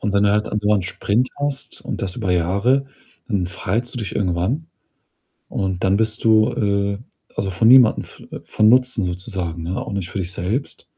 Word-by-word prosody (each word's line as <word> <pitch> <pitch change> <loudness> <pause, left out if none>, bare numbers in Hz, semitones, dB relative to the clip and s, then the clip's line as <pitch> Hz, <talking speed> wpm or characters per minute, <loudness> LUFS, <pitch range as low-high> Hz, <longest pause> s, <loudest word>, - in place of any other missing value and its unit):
Und 105 - -1
wenn 100 - +3
du 100 - +4
halt 105 +1 +1
andauernd 105 -2 +1
Sprint 110 +6 0
hast 145 -1 -2
und - - -5
das 95 -2 -3
über 100 -7 -2
Jahre, 100 +11 +2 0.4
dann 95 -5 0
verheizt 105 +7 -3
du - - -4
dich 105 - -5
irgendwann 95 - -1 0.8
und 95 -2 -2
dann 95 +1 +3
bist 110 0 -1
du, 110 -1 +4
äh, 100 -1 0 0.4
also, 95 - -2
für 95 +5 +1
niemandem 125 -2 +7
v - - -13
äh, - - -6
von 110 - +2
Nutzen 125 -3 +3
sozusagen, 90 -2 -4
ne? 90 +3 -3
Auch - - -6
nicht 95 -2 -3
für - - -5
dich 90 -1 -2
selbst 105 +10 -2
100 Hz, 190 wpm, -21 LUFS, 95-115 Hz, 0.8 s, niemandem